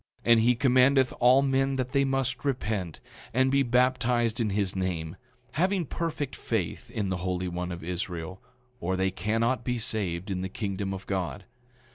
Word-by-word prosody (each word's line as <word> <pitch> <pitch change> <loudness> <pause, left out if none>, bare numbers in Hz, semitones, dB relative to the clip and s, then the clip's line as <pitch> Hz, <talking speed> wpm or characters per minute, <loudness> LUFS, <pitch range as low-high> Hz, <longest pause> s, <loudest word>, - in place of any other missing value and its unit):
9:23 115 - +4
And 115 - +7
he 120 +2 +4
commandeth 130 +1 +4
all 125 +3 +6
men 135 0 +1
that 130 -1 -2
they 140 0 +3
must 135 -2 -1
repent, 105 - -2 0.4
and 130 +1 +3
be 140 0 +4
baptized 125 -2 +2
in 115 -3 +1
his 100 -1 0
name, 90 -3 -2 0.4
having 185 +4 +1
perfect 150 -3 -3
faith 105 -8 -3
in 105 -3 -2
the 95 - -1
Holy 90 0 -2
One 90 0 -3
of 85 -1 -6
Israel, 90 +1 -4 0.4
or 95 +2 -1
they 95 0 +1
cannot 115 +6 0
be 125 -1 -1
saved 100 -4 -2
in 90 -1 -2
the 95 - -3
kingdom 100 0 -3
of 95 -1 -6
God. 95 +1 -3
110 Hz, 175 wpm, -28 LUFS, 95-130 Hz, 0.4 s, And